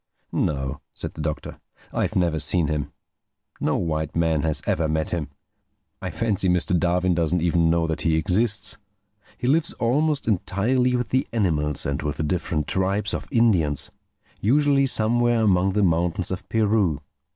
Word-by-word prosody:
"No," 70 -1 -2
said - - -6
the 80 - -7
Doctor, 75 0 -4 0.3
"I've - - -1
never 85 -3 +1
seen 80 +3 +1
him. 75 -2 -2 0.7
No - - 0
white 80 -2 -2
man 80 -2 +2
has 75 -3 -1
ever 80 -1 +1
met 80 0 -1
him. 80 -5 -2 0.7
I - - -3
fancy 105 -5 0
Mr. 90 +1 +1
Darwin 90 +1 +2
doesn't 85 0 0
even 85 -1 +3
know 85 0 +2
that 80 -1 -3
he 80 -1 +2
exists. 100 +7 0 0.6
He - - -5
lives 155 +5 +2
almost 145 +5 0
entirely 120 +5 +1
with 125 0 -1
the 130 +1 +1
animals 75 -10 0
and 70 0 -2
with 75 -1 -3
the - - -1
different 75 -1 -1
tribes 95 +4 0
of - - -4
Indians—usually 120 - +1
somewhere 120 0 +2
among 95 -2 +3
the 105 0 +2
mountains 85 +1 +1
of 95 - -5
Peru. 105 -8 +2
90 Hz, 155 wpm, -24 LUFS, 80-110 Hz, 0.7 s, even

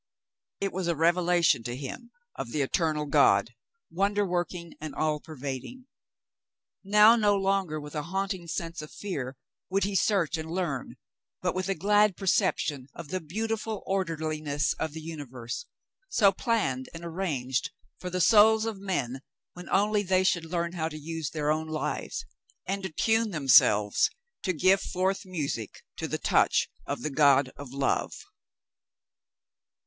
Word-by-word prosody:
It 195 - -2
was 185 -1 -2
a 170 - +1
revelation 170 -3 +3
to 120 +1 -4
him 145 - -7 0.3
of 120 - -5
the 145 +3 0
eternal 155 +1 0
God, 140 - +4 0.4
wonder 200 +3 +1
working 175 -2 -3
and 155 -1 -6
all 155 -1 0
pervading. 145 - -7 1.0
Now 210 +3 +7
no 210 -3 +3
longer 195 -5 0
with 150 0 -9
a 150 - -2
haunt 195 +5 -2
ing 175 -2 -10
sense 165 0 -4
of 150 - -10
fear 135 -10 -5 0.3
would 195 +1 +1
he 200 +1 -1
search 185 -4 +2
and 160 0 -6
learn, 165 -7 -3 0.5
but - - +1
with 185 +1 -2
a 195 - +1
glad 205 -1 +3
perception 145 -7 +1
of 165 -4 -9
the 185 +3 -2
beautiful 220 +6 -3
orderliness 155 -6 -1
of 155 - -2
the 160 - -7
uni 160 -2 -6
verse, 125 - -7 0.4
so 200 - +5
planned 190 - -1
and 170 +1 -7
arranged 160 -5 -2 0.3
for 180 - -5
the 180 0 -2
souls 220 +2 +6
of 220 -3 -4
men 135 -10 -2 0.3
when 180 0 -10
only 210 +1 +2
they 185 -1 +2
should 170 -3 +1
learn 170 0 -2
how 160 -2 -2
to 155 - -8
use 160 -1 -4
their 150 -1 -1
own 160 +1 -1
lives, 155 - -3 0.4
and 195 +1 -2
66 165 -5 -2
The 225 - +1
Mountain 225 +1 +5
Girl - - -3
attune - - -8
themselves 105 -8 +5 0.3
to 185 - 0
give 185 +4 +4
forth 190 +1 -1
music 145 - -4
to - - -3
the - - -2
touch - - +2 0.2
of - - -3
the 155 - -2
God 140 -2 +4
of 140 -3 -9
Love. 135 0 0
170 Hz, 165 wpm, -28 LUFS, 150-195 Hz, 1.0 s, Now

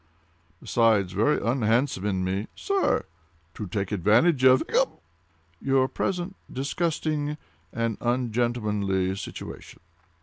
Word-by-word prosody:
"Besides, 110 -5 +2
very 110 +10 +2
unhandsome 115 -3 +1
in 95 -2 0
me—" 95 +3 -2
"Sir!" 395 -1 0 0.5
"To 105 - -6
take 100 +1 -3
advantage 115 - +3
of—" 130 0 +7
"Hiccup!" - - +1 0.6
"Your 135 -1 +3
present 180 +5 -2 0.2
disgusting 150 +1 -1 0.3
and 115 -2 -2
ungentlemanly 110 -6 0
situation." 100 - -8
115 Hz, 100 wpm, -26 LUFS, 100-135 Hz, 0.6 s, of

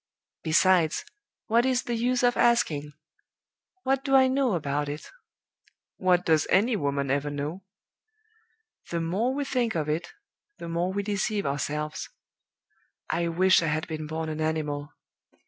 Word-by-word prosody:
Besides, 170 - +3 0.4
what 235 +1 +3
is 255 -1 +1
the 240 - -3
use 245 +2 +1
of 245 0 +4
asking? 155 -12 +2 0.9
What 270 0 +1
do 270 -1 +2
I 260 -1 +7
know 260 -5 +1
about 145 -2 -2
it? 150 +2 -7 0.9
What 180 -1 +2
does 160 -2 +3
any 220 +5 +3
woman 140 -6 -1
ever 145 +1 0
know? 145 +6 -4 1.3
The 170 - -1
more 190 +10 0
we 285 0 -1
think 245 -5 0
of 155 -2 -1
it, 160 +3 -2 0.5
the - - -7
more 170 +2 -1
we 200 +1 -2
deceive 205 +1 -1
ourselves. 150 +2 -3 1.0
I 170 0 0
wish 185 +3 +4
I 165 - -1
had 155 +1 -1
been 155 -1 -5
born 160 +1 -3
an 155 0 -4
animal. 150 -2 -2
170 Hz, 145 wpm, -27 LUFS, 150-230 Hz, 1.3 s, I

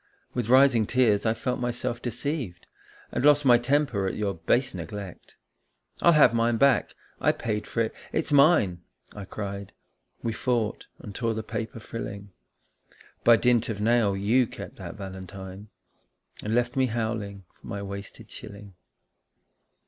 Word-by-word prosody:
With 120 -3 -2
rising 130 -4 +5
tears 115 -4 +3
I 110 - +2
felt 125 +2 -2
myself 120 -1 -3
deceived 125 - -4 0.5
And - - -2
lost 145 0 +5
my 120 -2 +7
temper 120 -6 +1
at - - -3
your 100 -2 -1
base 120 +10 0
neglect. 90 +2 -8 0.3
" - - -26
I'll 170 - +6
have 145 -6 +6
mine 115 0 +2
back 140 +1 +3 0.2
I - - +3
paid 105 -2 -3
for 115 - -1
it 110 - -1 0.2
it's - - -1
mine! 140 - +4 0.2
" - - -24
I 100 -2 -7
cried. 100 0 -6 0.5
We 115 - -1
fought 115 -2 -1
and 105 - -10
tore 115 +1 -1
the 110 - -3
paper 115 0 -5
frilling. 100 -3 -7 0.9
By 115 - +7
dint 120 0 +2
of 105 -2 -3
nail 110 -2 +2
you 115 +5 +3
kept - - -9
that - - -8
valentine, 95 0 -8 0.7
And 110 +2 -1
left 120 +2 +1
me 130 -1 +3
howling 110 -4 -3
for - - -16
my 100 0 -4
wasted 100 0 -8
shilling. 100 -1 -10
110 Hz, 155 wpm, -26 LUFS, 100-125 Hz, 0.9 s, my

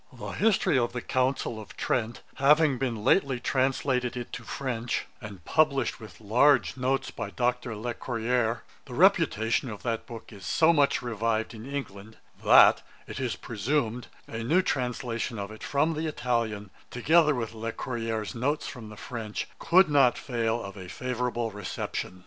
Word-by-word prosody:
'The - - -6
History 205 -10 +2
of 120 -1 -1
the 125 - -3
Council 130 -3 -1
of 105 - -13
Trent 115 -1 -1
having 145 -1 +4
been 115 -5 -2
lately 135 - +3
translated 130 -1 0
into 120 0 -6
French, 120 +1 -3 0.2
and 100 -6 -10
published 150 -6 +2
with 110 -2 -12
large 125 +7 +3
Notes 130 +1 -1
by - - -5
Dr. 125 -2 -1
Le 120 +3 -4
Courayer, 115 0 -1 0.2
the - - -8
reputation 115 +4 +3
of 105 -2 -8
that 115 -2 -2
book 115 -1 -10
is 100 -2 -12
so 165 - +4
much 145 -5 +2
revived 115 -1 -1
in 115 +5 -9
England, 110 -6 -6 0.3
that, - - +7 0.2
it - - -7
is - - -1
presumed, 120 +1 -2 0.2
a 115 0 -5
new 170 +10 +3
translation 125 -5 -2
of 100 0 -5
it 110 - -11
from 150 +3 +1
the 160 +1 -2
Italian, 115 -8 -2 0.2
together 150 +4 +3
with 115 -2 -3
Le 115 +1 -4
Courayer's 115 -3 -3
Notes 140 +6 -1
from 115 -5 -8
the 105 - -11
French, 110 -2 -5
could 185 +3 +5
not 140 -4 +4
fail 115 -2 -1
of 100 0 -8
a 95 -2 -9
favourable 125 -1 -2
reception. 100 -2 -5
120 Hz, 160 wpm, -27 LUFS, 110-135 Hz, 0.3 s, that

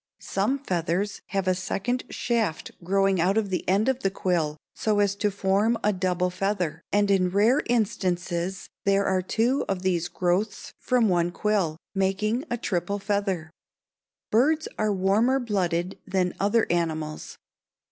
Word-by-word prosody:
Some 205 +8 -1
feathers 190 - -2
have 195 -1 -2
a 185 - +4
second 195 +7 -2
shaft 225 -9 -1
growing 195 0 +2
out 190 +5 +2
of 205 -3 0
the 180 - -2
end 200 +5 +3
of 265 -1 +1
the 195 - +1
quill 170 -5 -1 0.2
so 215 -1 0
as 205 -1 +3
to 210 0 +1
form 200 +4 +1
a 210 - +3
double 180 -1 0
feather, 180 -4 -2
and 205 0 +3
in 185 -2 +3
rare 210 +8 +3
instances 190 -5 -1 0.2
there 200 0 +2
are 190 -1 +2
two 230 +8 +1
of 190 -1 -2
these 175 -2 +1
growths 185 +4 -1
from 250 -3 +2
one 175 -2 +2
quill, 190 -6 0 0.2
making 205 - 0
a 240 - -1
triple 195 -2 -1
feather. 195 -5 -2 0.8
Birds 305 +8 +3
are 215 -1 0
warmer 205 +7 +2
blooded 185 -6 -1
than 185 -2 0
other 205 +3 +3
animals. 160 -3 -2
195 Hz, 150 wpm, -26 LUFS, 180-215 Hz, 0.8 s, a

